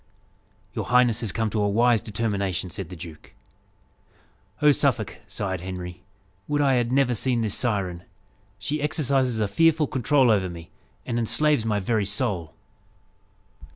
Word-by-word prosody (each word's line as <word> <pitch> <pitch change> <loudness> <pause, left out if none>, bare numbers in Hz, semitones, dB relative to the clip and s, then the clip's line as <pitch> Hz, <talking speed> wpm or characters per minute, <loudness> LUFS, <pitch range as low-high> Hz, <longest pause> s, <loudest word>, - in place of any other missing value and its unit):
"Your - - -3
highness 120 -2 +3
has 110 -5 -2
come 110 +2 -1
to 110 - 0
a 105 - +2
wise 115 +1 +3
determination," 100 -5 -2
said 95 -5 -5
the 90 - -8
duke. 80 -2 -11 1.3
"Oh, 150 0 +6
Suffolk!" - - 0
sighed 95 -3 -3
Henry, 90 -1 -7 0.5
"would 145 0 0
I 140 -2 +3
had 120 -1 +1
never 130 -2 +3
seen 120 +1 0
this 110 -3 -1
siren! 95 -8 -1 0.6
She 140 +10 -3
exercises 135 -5 +1
a 105 - +1
fearful 160 +8 +3
control 130 -1 +2
over 95 -4 +1
me, 85 -1 -10 0.3
and 120 -1 -1
enslaves 120 +3 +2
my 105 -2 +1
very 105 +1 0
soul." 100 -6 -1
110 Hz, 150 wpm, -25 LUFS, 95-130 Hz, 1.3 s, Oh